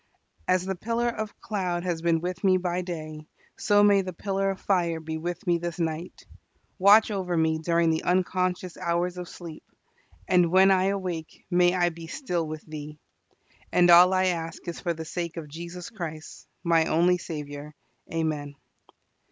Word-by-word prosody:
As 185 Hz, 0 st, +2 dB
the 190 Hz, -, -1 dB
pillar 230 Hz, +5 st, -1 dB
of 220 Hz, -2 st, -5 dB
cloud 180 Hz, -5 st, -2 dB
has 175 Hz, -3 st, -2 dB
been 165 Hz, -1 st, +2 dB
with 180 Hz, +2 st, -4 dB
me 190 Hz, -1 st, +5 dB
by 180 Hz, 0 st, -1 dB
day, 155 Hz, -3 st, -7 dB, 0.3 s
so 205 Hz, 0 st, +4 dB
may 200 Hz, -1 st, +5 dB
the 185 Hz, -1 st, -5 dB
pillar 195 Hz, +2 st, -1 dB
of 190 Hz, -1 st, -3 dB
fire 170 Hz, -4 st, 0 dB
be 160 Hz, 0 st, -5 dB
with 175 Hz, +4 st, -5 dB
me 175 Hz, -2 st, +2 dB
this 170 Hz, 0 st, -4 dB
night. 165 Hz, +1 st, -4 dB, 0.5 s
Watch 210 Hz, +4 st, +6 dB
over 185 Hz, -4 st, -2 dB
me 160 Hz, 0 st, +2 dB
during 170 Hz, 0 st, +2 dB
the 160 Hz, -, 0 dB
unconscious 185 Hz, 0 st, 0 dB
hours 175 Hz, +1 st, -1 dB
of 180 Hz, -, -7 dB
sleep, 165 Hz, -3 st, -9 dB, 0.7 s
and 180 Hz, -2 st, +4 dB
when 190 Hz, +1 st, +6 dB
I 190 Hz, -1 st, +3 dB
awake 185 Hz, -5 st, -3 dB
may 175 Hz, 0 st, +4 dB
I 175 Hz, -1 st, +3 dB
be 165 Hz, -1 st, -10 dB
still 175 Hz, -, -2 dB
with 155 Hz, 0 st, -7 dB
Thee. 150 Hz, -1 st, -8 dB, 0.7 s
And 175 Hz, -1 st, +5 dB
all 175 Hz, +2 st, +8 dB
I 185 Hz, 0 st, +2 dB
ask 170 Hz, -1 st, -3 dB
is 170 Hz, -, -4 dB
for 170 Hz, -2 st, -1 dB
the 160 Hz, 0 st, -6 dB
sake 170 Hz, +1 st, -4 dB
of 160 Hz, -2 st, -6 dB
Jesus 170 Hz, +6 st, -8 dB
Christ, 160 Hz, -7 st, -8 dB, 0.2 s
my 165 Hz, -2 st, +3 dB
only 175 Hz, +3 st, +3 dB
Saviour. 150 Hz, -2 st, -7 dB, 0.4 s
Amen. 155 Hz, -3 st, -2 dB
175 Hz, 175 wpm, -26 LUFS, 160-185 Hz, 0.7 s, all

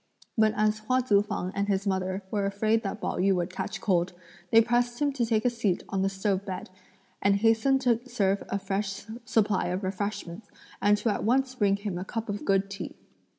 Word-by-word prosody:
But 220 Hz, -1 st, +3 dB
as 215 Hz, 0 st, +2 dB
both 215 Hz, -, -22 dB
Hua 255 Hz, 0 st, +3 dB
Tzu 205 Hz, -5 st, +4 dB
fang 185 Hz, -3 st, -3 dB
and 200 Hz, +1 st, -1 dB
his 200 Hz, 0 st, 0 dB
mother 190 Hz, 0 st, -1 dB
were 205 Hz, -2 st, 0 dB
afraid 215 Hz, +3 st, +1 dB
that 210 Hz, 0 st, -4 dB
Pao -, -, -2 dB
yü 195 Hz, +1 st, +3 dB
would 180 Hz, 0 st, -2 dB
catch -, -, -4 dB
cold, 180 Hz, -2 st, +1 dB, 0.4 s
they 225 Hz, -, +7 dB
pressed 240 Hz, +1 st, +1 dB
him 290 Hz, -1 st, +2 dB
to 255 Hz, -3 st, 0 dB
take 225 Hz, 0 st, +1 dB
a -, -, +5 dB
seat 215 Hz, -6 st, 0 dB
on 195 Hz, -, -1 dB
the 195 Hz, -, +2 dB
stove 195 Hz, 0 st, -1 dB
bed, 190 Hz, -2 st, -6 dB, 0.5 s
and 200 Hz, 0 st, +4 dB
hastened 225 Hz, +6 st, +3 dB
to 240 Hz, -3 st, +3 dB
serve 200 Hz, -5 st, +1 dB
a 200 Hz, -, 0 dB
fresh 195 Hz, 0 st, -3 dB, 0.2 s
supply 210 Hz, -3 st, +2 dB
of 180 Hz, +3 st, -2 dB
refreshments, 195 Hz, 0 st, -4 dB, 0.3 s
and 205 Hz, +1 st, +4 dB
to 225 Hz, -, 0 dB
at 205 Hz, -, -1 dB
once 260 Hz, +3 st, +2 dB
bring 205 Hz, -5 st, +2 dB
him 200 Hz, -3 st, -4 dB
a -, -, -3 dB
cup 225 Hz, +3 st, -5 dB
of 205 Hz, 0 st, -4 dB
good 195 Hz, 0 st, +2 dB
tea. 200 Hz, +1 st, -7 dB
205 Hz, 215 wpm, -28 LUFS, 195-225 Hz, 0.5 s, they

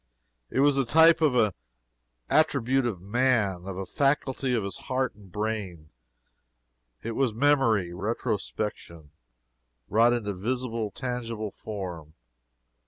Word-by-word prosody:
It 130 Hz, -, +1 dB
was 145 Hz, -1 st, +4 dB
the 135 Hz, -, +3 dB
type 160 Hz, +6 st, +5 dB
of 150 Hz, -5 st, +3 dB
an 110 Hz, -4 st, +4 dB, 0.8 s
attribute 135 Hz, -4 st, +2 dB
of 95 Hz, -7 st, -4 dB
man 100 Hz, -5 st, +1 dB
of 95 Hz, -2 st, -5 dB
a 95 Hz, -, -4 dB
faculty 135 Hz, +2 st, 0 dB
of 110 Hz, -, 0 dB
his 100 Hz, -2 st, -4 dB
heart 130 Hz, -1 st, 0 dB
and 100 Hz, -3 st, -17 dB
brain. 100 Hz, -7 st, -4 dB, 1.1 s
It 115 Hz, -, -3 dB
was 120 Hz, -2 st, 0 dB
MEMORY 115 Hz, -9 st, +2 dB
RETROSPECTION 95 Hz, -5 st, -4 dB, 0.8 s
wrought 115 Hz, +3 st, +4 dB
into 105 Hz, -4 st, -2 dB
visible, 115 Hz, +2 st, -2 dB
tangible 115 Hz, -2 st, -4 dB
form. 90 Hz, -9 st, -7 dB
115 Hz, 120 wpm, -27 LUFS, 100-130 Hz, 1.1 s, type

